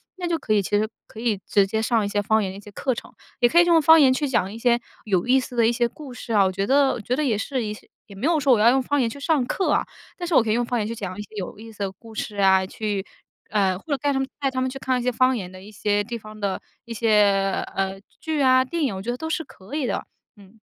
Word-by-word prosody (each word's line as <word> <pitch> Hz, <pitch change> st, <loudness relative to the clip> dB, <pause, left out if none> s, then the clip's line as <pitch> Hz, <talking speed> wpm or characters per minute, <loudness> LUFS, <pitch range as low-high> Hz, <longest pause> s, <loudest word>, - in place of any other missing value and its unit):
那 360 Hz, -2 st, -4 dB
就 335 Hz, -1 st, 0 dB
可 215 Hz, -, -1 dB
以， 205 Hz, -, +3 dB
其 -, -, -7 dB
实 215 Hz, +1 st, +1 dB, 0.2 s
可 220 Hz, -, -12 dB
以 225 Hz, -4 st, 0 dB
直 200 Hz, -1 st, +4 dB
接 220 Hz, +2 st, -1 dB
上 225 Hz, -1 st, +1 dB
一 -, -, -1 dB
些 205 Hz, 0 st, 0 dB
方 220 Hz, +1 st, +2 dB
言 190 Hz, -, -3 dB
的 190 Hz, -, -9 dB
一 -, -, -9 dB
些 210 Hz, -, -13 dB
课 260 Hz, +5 st, -1 dB
程， 235 Hz, -, -9 dB, 0.3 s
也 240 Hz, -, +4 dB
可 340 Hz, -, +5 dB
以 345 Hz, -, +6 dB
用 335 Hz, -2 st, +5 dB
方 320 Hz, +2 st, +7 dB
言 265 Hz, -3 st, +6 dB
去 290 Hz, +2 st, -1 dB
讲 195 Hz, -7 st, 0 dB
一 -, -, -7 dB
些 235 Hz, 0 st, +2 dB, 0.3 s
有 190 Hz, -5 st, +1 dB
意 260 Hz, +1 st, +5 dB
思 250 Hz, -1 st, -7 dB
的 235 Hz, -1 st, +4 dB
一 -, -, +3 dB
些 240 Hz, 0 st, +1 dB
故 265 Hz, +2 st, -11 dB
事 245 Hz, -, -8 dB
啊， 205 Hz, -2 st, +5 dB
我 190 Hz, -, +1 dB
觉 195 Hz, +1 st, -2 dB
得 275 Hz, +1 st, +4 dB
我 235 Hz, -, -5 dB
觉 245 Hz, +5 st, -1 dB
得 305 Hz, -, 0 dB
也 225 Hz, -6 st, +1 dB
是 255 Hz, +3 st, -2 dB
一 210 Hz, -1 st, -3 dB
些 210 Hz, -, -15 dB, 0.2 s
也 200 Hz, -, -13 dB
没 195 Hz, -, -4 dB
有 330 Hz, -2 st, +3 dB
说 275 Hz, -2 st, +4 dB
我 230 Hz, -, +3 dB
要 220 Hz, +2 st, +6 dB
用 265 Hz, +2 st, +3 dB
方 285 Hz, +3 st, 0 dB
言 235 Hz, -, +1 dB
去 280 Hz, -, -9 dB
上 290 Hz, -2 st, +1 dB
课 375 Hz, +9 st, 0 dB
啊， -, -, +2 dB, 0.3 s
但 350 Hz, -, -4 dB
是 335 Hz, -, 0 dB
我 245 Hz, -, +6 dB
可 225 Hz, -, -3 dB
以 -, -, +3 dB
用 240 Hz, +2 st, +1 dB
方 240 Hz, 0 st, -1 dB
言 210 Hz, -, -1 dB
去 230 Hz, -, -3 dB
讲 195 Hz, -4 st, -5 dB
一 -, -, -4 dB
些 210 Hz, -, -9 dB
有 200 Hz, -1 st, -5 dB
意 225 Hz, +1 st, -10 dB
思 215 Hz, -, -19 dB
的 195 Hz, -1 st, -2 dB
故 225 Hz, +4 st, -15 dB
事 210 Hz, -1 st, -4 dB
啊， 190 Hz, -1 st, +4 dB
去， 205 Hz, 0 st, -3 dB, 0.5 s
呃， 195 Hz, -3 st, +2 dB
或 -, -, -24 dB
者 -, -, +1 dB
带 285 Hz, +2 st, 0 dB
他 270 Hz, -, 0 dB
们 270 Hz, -, -1 dB
带 275 Hz, -2 st, 0 dB
他 255 Hz, -1 st, -2 dB
们 260 Hz, -, 0 dB
去 265 Hz, -, -7 dB
看 255 Hz, -1 st, 0 dB
一 -, -, -4 dB
些 250 Hz, -, +1 dB
方 255 Hz, +2 st, +3 dB
言 185 Hz, -6 st, -5 dB
的 185 Hz, 0 st, -12 dB
一 210 Hz, -, -12 dB
些 205 Hz, 0 st, 0 dB
地 235 Hz, +3 st, -6 dB
方 215 Hz, -1 st, -12 dB
的 200 Hz, -2 st, -2 dB, 0.2 s
一 235 Hz, -, -6 dB
些， 205 Hz, -4 st, +2 dB
呃， 195 Hz, 0 st, -2 dB, 0.2 s
剧 315 Hz, -2 st, -2 dB
啊， 260 Hz, -1 st, +5 dB
电 330 Hz, +5 st, -3 dB
影 255 Hz, -9 st, 0 dB
我 190 Hz, -, -5 dB
觉 220 Hz, -, -6 dB
得 245 Hz, -, -1 dB
都 320 Hz, -, -5 dB
是 320 Hz, 0 st, -1 dB
可 195 Hz, -5 st, -15 dB
以 285 Hz, -5 st, -1 dB
的。 -, -, -2 dB, 0.3 s
嗯 200 Hz, +2 st, -18 dB
230 Hz, 345 characters per minute, -23 LUFS, 205-265 Hz, 0.5 s, 方